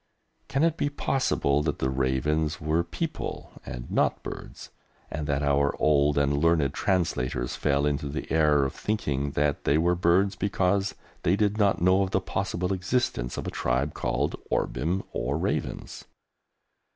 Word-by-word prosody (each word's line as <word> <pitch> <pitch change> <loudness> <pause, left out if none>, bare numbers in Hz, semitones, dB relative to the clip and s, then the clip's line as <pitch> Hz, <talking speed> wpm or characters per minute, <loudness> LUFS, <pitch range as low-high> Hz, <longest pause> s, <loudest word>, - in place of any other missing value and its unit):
Can 135 +3 0
it 165 -1 +2
be 145 - 0
possible 100 - +1
that 75 -1 -1
the 65 - -1
ravens 70 +5 0
were 80 +1 +1
people 85 0 -5 0.2
and - - -7
not - - +1
birds, - - -8 0.4
and 75 -1 -3
that 70 0 0
our 70 0 +2
old 75 -1 +3
and 70 0 +2
learned 80 -3 +3
translators 80 -12 0
fell 70 -1 +1
into 70 0 -1
the 75 - -4
error 75 -3 +4
of 70 - -3
thinking 70 -11 -2
that 75 0 0
they 70 - +3
were 85 +2 +3
birds, 90 +3 +2
because 95 0 0 0.3
they 85 - +3
did 105 +1 +1
not 100 -4 +2
know 95 +2 +5
of 95 - 0
the 95 - +1
possible 95 0 -2
existence 95 - -1
of - - -4
a - - -3
tribe 65 +4 0
called - - -1
"Orbim" 90 +6 -1
or 65 +5 -1
"Ravens"? - - -3
75 Hz, 160 wpm, -27 LUFS, 70-95 Hz, 0.4 s, know